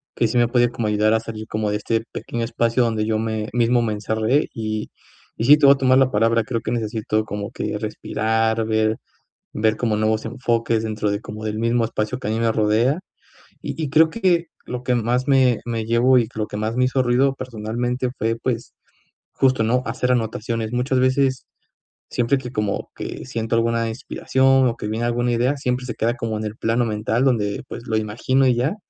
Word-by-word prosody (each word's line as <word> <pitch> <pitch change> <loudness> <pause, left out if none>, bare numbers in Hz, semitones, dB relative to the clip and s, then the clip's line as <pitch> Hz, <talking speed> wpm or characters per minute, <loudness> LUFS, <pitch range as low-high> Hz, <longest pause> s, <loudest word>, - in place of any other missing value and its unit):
que 115 - +2
sí 110 - -1
me 120 0 +4
puede 120 0 +3
como 115 -2 -2
ayudar 105 +1 +2
a 110 - +3
salir 110 -1 -7
como 105 0 -2
de 105 - 0
este 110 +1 -1
pequeño 120 -1 -4
espacio 115 +2 +1
donde 110 -2 0
yo 110 0 0
me 110 -1 -2
mismo 120 0 +3
me 110 -2 0
encerré 110 +6 0
y 110 -1 -3 0.5
y - - -2
sí 145 +4 +8
te 150 - +3
voy 140 - +9
a - - -8
tomar 130 -1 +4
la 130 -1 +3
palabra, 115 +1 +2
creo 115 +1 -3
que - - -4
necesito 110 -2 -1
como 105 -1 -5
que - - -3
respirar, 110 +1 -1
ver 110 0 +1 0.6
ver 110 +1 +1
como 115 -3 0
nuevos 110 0 0
enfoques 115 -2 0
dentro 110 -1 -2
de 100 +1 -2
como 110 0 -8
del 110 0 -3
mismo 115 +1 +1
espacio 115 +2 -3
que - - -5
a - - 0
mí 110 - -1
me 115 -1 +2
rodea. 110 +7 +2 0.6
Y - - -5
y 150 - -2
creo 160 +3 +5
que 175 -4 +1 0.2
lo 125 0 -5
que 125 - +1
más 120 +2 0
me 130 -4 +4
me 115 -2 -3
llevó 120 +3 +4
y 120 -3 +2
lo 105 -1 -2
que - - -6
más 110 +2 -2
me 125 0 +3
hizo 130 +1 +1
ruido, 130 +2 +2
personalmente 120 +1 -3
fue, 115 +1 0
pues, 115 0 -3 0.6
justo, 130 -3 +2
¿no? 125 +3 +1
Hacer 125 +2 0
anotaciones. 115 -1 -2
Muchas 125 +2 0
veces 130 0 +1 0.6
siempre 120 +3 +1
que 125 -2 -7
como 105 -4 -2
que - - -6
siento 115 -3 -2
alguna 115 0 +1
inspiración 130 +2 +2
o 115 - -1
que 105 - -5
viene 110 +2 -2
alguna 120 +1 0
idea, 120 +4 +1
siempre 125 -1 -2
se 120 - -4
queda 115 +2 0
como 115 -3 -3
en 105 - -4
el 105 0 -5
plano 115 +2 +1
mental 110 +2 -1
donde, 105 -6 0
pues, 120 - -8
lo 110 - -1
imagino 115 +5 +1
y 125 - +3
ya, 130 +10 0
115 Hz, 210 wpm, -21 LUFS, 110-125 Hz, 0.6 s, voy